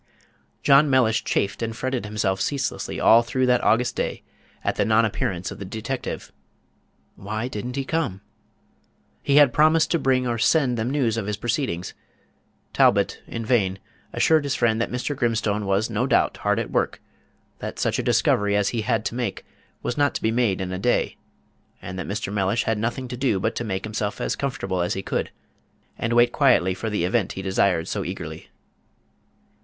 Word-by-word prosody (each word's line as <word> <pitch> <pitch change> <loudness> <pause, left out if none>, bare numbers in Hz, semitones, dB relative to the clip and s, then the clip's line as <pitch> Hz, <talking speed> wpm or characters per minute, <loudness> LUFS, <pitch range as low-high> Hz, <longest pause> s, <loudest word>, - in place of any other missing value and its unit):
John 140 +1 +6
Mellish 125 -4 +3
chafed 100 - -1
and 115 -1 -3
fretted 130 -3 -2
himself 100 -3 -1
ceaselessly 135 +6 -2
all 115 - +6
through 130 +2 0
that 125 -1 +2
August 120 +2 +2
day - - -3 0.4
at - - 0
the - - +1
nonappearance 110 -5 0
of - - -9
the - - -5
detective. 110 +7 -5 0.8
Why 110 +4 -4
did 105 -2 -5
n't 125 - -5
he 135 -1 -2
come? 135 - -2 1.0
He 140 - +1
had 145 -4 +6
promised 155 +1 +4
to 170 - +2
bring 130 -2 +2
or 120 -1 -1
send 135 0 +3
them 115 +1 -1
news 130 -5 0
of 105 -3 -3
his 105 -1 -2
proceedings. 115 - -2 0.8
Talbot - - +3
in 115 -1 -5
vain 100 -6 +1 0.3
assured 160 -2 +3
his 140 -1 -1
friend 115 -1 +1
that - - -1
Mr. 125 +4 -3
Grimstone 110 -4 0
was 100 +3 +1
no 115 +3 -1
doubt - - +2
hard - - 0
at - - -3
work; - - 0 0.6
that - - -6
such - - 0
a - - -1
discovery 105 0 +2
as 105 -1 +2
he 115 - -2
had 110 -1 0
to - - -2
make 120 -5 -3 0.4
was 120 - -2
not 145 0 +2
to - - -3
be 110 - +2
made 115 -5 +1
in 90 -1 -3
a 90 - -3
day; 120 +5 +1 0.6
and 90 +1 -7
that 90 - -5
Mr. 100 0 -3
Mellish 100 +2 +1
had 110 -1 -1
nothing 120 +4 -2
to 125 - -5
do 125 -7 +1
but 110 +4 -1
to 120 - -3
make 95 -4 -3
himself 105 0 -3
as - - -1
comfortable 135 -9 -2
as 90 +3 -1
he 95 - -4
could, - - -2 0.7
and 115 +1 -2
wait 120 0 +5
quietly 120 - +3
for 110 +4 -4
the 105 -5 -1
event 110 +1 0
he 95 - -6
desired 95 -3 +1
so - - -2
eagerly. - - -7
115 Hz, 190 wpm, -24 LUFS, 100-125 Hz, 1.0 s, John